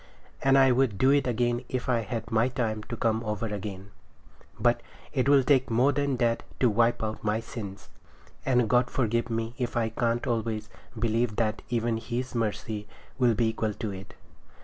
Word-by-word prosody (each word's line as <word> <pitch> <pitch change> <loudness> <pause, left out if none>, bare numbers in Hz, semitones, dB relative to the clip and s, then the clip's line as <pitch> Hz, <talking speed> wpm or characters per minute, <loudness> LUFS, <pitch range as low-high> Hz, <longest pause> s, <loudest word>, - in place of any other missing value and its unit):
And 135 0 +5
I 135 -1 +6
would 125 -5 +2
do 130 +5 +4
it 140 -2 +3
again 120 +1 0
if 130 -1 -3
I 125 -2 +2
had 115 0 -4
my 115 +2 +3
time 115 -4 -2
to 115 - -5
come 115 0 +1
over 105 0 -2
again; 100 -2 -5 0.7
but - - +2 0.3
it 130 +1 +1
will 140 -2 +6
take 130 0 +3
more 125 +5 +4
than 140 -1 0
that 115 -1 +1 0.2
to 125 -3 +4
wipe 115 +2 +2
out 110 0 -4
my 105 0 +1
sins, 110 -4 -8 0.6
and 125 -3 +2
God 125 +2 +3
forgive 115 -1 0
me 115 0 -2
if 120 -1 -2
I 115 -1 +1
can't 115 +1 0
always 110 -2 -2 0.3
believe 115 0 0
that 110 -1 0
even 115 -1 0
His 120 +3 -4
mercy 110 -2 -2 0.3
will 120 -3 +4
be 115 +1 +2
equal 110 -2 -2
to 110 - -4
it. 95 0 -9
115 Hz, 185 wpm, -28 LUFS, 110-125 Hz, 0.7 s, I